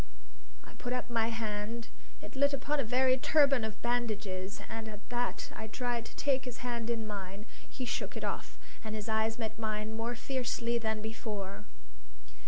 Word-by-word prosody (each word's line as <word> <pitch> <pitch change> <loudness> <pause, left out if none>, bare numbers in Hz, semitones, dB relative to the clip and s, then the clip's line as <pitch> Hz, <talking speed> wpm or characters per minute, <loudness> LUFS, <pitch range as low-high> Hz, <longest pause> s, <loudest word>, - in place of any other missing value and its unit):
I - - -13
put 245 - -3
up 250 -1 -2
my 225 -1 +4
hand; 225 0 -2 0.3
it - - -8
lit 285 +1 +5
upon 285 +2 +1
a - - +4
very 255 +2 +5
turban 280 -4 +6
of 220 -1 -3
bandages, 210 -6 0
and 225 -1 -4
at 210 -1 -9
that 245 0 0
I 220 - -4
tried 240 0 -1
to - - -12
take 275 -2 +2
his 250 0 -5
hand 235 -2 -1
in 230 -2 +1
mine. 200 -1 -4 0.2
He 255 - -3
shook 225 - -1
it - - -4
off, - - -2 0.3
and 220 -1 -3
his 215 0 -3
eyes 220 0 +2
met 225 -1 -3
mine 215 0 -1
more 230 +2 -1
fiercely 240 -2 +1
than 220 -1 0
before. 210 -3 -3
230 Hz, 180 wpm, -34 LUFS, 215-245 Hz, 0.3 s, turban